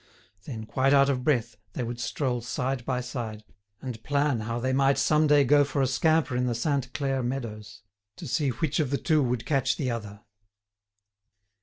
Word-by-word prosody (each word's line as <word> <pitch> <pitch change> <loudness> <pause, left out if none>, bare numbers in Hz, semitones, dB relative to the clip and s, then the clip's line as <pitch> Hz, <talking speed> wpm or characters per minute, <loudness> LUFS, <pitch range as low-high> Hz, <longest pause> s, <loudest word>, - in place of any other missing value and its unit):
Then, 110 -6 -6
quite 130 +5 +1
out 140 0 +5
of 130 -2 -1
breath, 130 -5 0 0.2
they 125 - -3
would 120 0 -5
stroll 125 0 -2
side 125 +1 -2
by 125 -1 -1
side, 115 -4 -6 0.4
and 125 -4 -6
plan 145 -3 +1
how 115 +2 -3
they 130 +2 -1
might 135 0 +3
some 150 +3 +3
day 145 -1 +5
go 145 +2 +5
for 140 0 -3
a 135 - +3
scamper 145 +2 +2
in 125 0 +1
the 120 - -1
Sainte 130 +1 -1
Claire 135 -2 -1
meadows, 110 -5 -5 0.3
to 170 - -8
see 145 +2 0
which 145 +5 -1
of 150 -4 +1
the 140 - 0
two 155 0 +2
would 125 -3 -1
catch 135 -4 +1
the 130 -4 -1
other. 105 -3 -6
130 Hz, 190 wpm, -27 LUFS, 120-140 Hz, 0.4 s, out